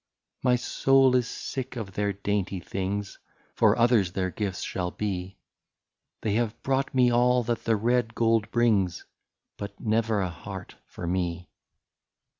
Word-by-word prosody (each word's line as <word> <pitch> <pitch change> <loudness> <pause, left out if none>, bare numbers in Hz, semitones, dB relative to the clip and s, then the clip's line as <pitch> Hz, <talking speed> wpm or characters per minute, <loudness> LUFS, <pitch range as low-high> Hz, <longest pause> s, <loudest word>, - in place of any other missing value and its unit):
" - - -46
My 125 -1 +4
soul 135 +1 +3
is 125 -2 +2
sick 130 +1 -5
of 110 -5 -5
their 100 +1 0
dainty 100 -1 -2
things 100 +3 -4 0.2
— - - -36
For - - +4
others 115 -7 +3
their 95 -1 -1
gifts 95 0 -3
shall 90 -2 -2
be 95 -1 -4 0.4
— - - -59
They 105 - 0
have 115 0 0
brought 135 0 0
me 125 -1 +5
all 125 +1 +3
that 120 0 -2
the 115 - +3
red 115 +1 +1
gold 115 -2 +2
brings. 105 -7 +1 0.5
But 100 0 -7
never 110 -1 +1
a 95 -2 -1
heart 95 +3 -8
for 90 - -7
me. 90 -1 -2
105 Hz, 160 wpm, -27 LUFS, 95-120 Hz, 0.5 s, me